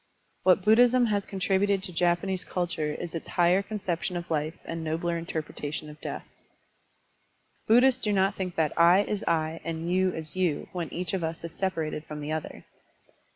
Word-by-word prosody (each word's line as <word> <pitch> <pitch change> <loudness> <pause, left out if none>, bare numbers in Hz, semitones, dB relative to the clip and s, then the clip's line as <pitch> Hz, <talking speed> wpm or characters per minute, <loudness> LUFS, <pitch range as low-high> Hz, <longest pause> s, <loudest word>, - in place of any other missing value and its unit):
What 185 0 +4
Buddhism 245 +3 +6
has 205 -3 0
contributed 195 0 +1
to 180 - -5
Japanese 175 +2 +1
ctdture 165 -4 -2
is 170 - -6
its 165 - -5
higher 175 +2 +3
conception 190 -3 -3
of 170 -1 -7
life 155 +1 -1
and 165 0 -4
nobler 165 +2 -1
inter 165 -1 -3
pretation 150 +1 -6
of 150 - -15
death. - - -5 1.4
Buddhists 250 +3 +5
do 210 - 0
not 195 0 +3
think 180 -2 -4
that 155 -2 +1
"I" 175 +4 +7
is 205 -1 -3
"I" 160 0 0
and 165 +1 -3
"you" 185 0 +3
is 160 0 -7
"you" 180 -5 0
when 175 -3 -4
each 180 +1 -3
of 185 -3 -1
us 160 0 -4
is 165 -1 -6
separated 165 -5 -2
from 150 0 -7
the 150 +1 -4
other. 155 0 -5
175 Hz, 180 wpm, -28 LUFS, 160-190 Hz, 1.4 s, I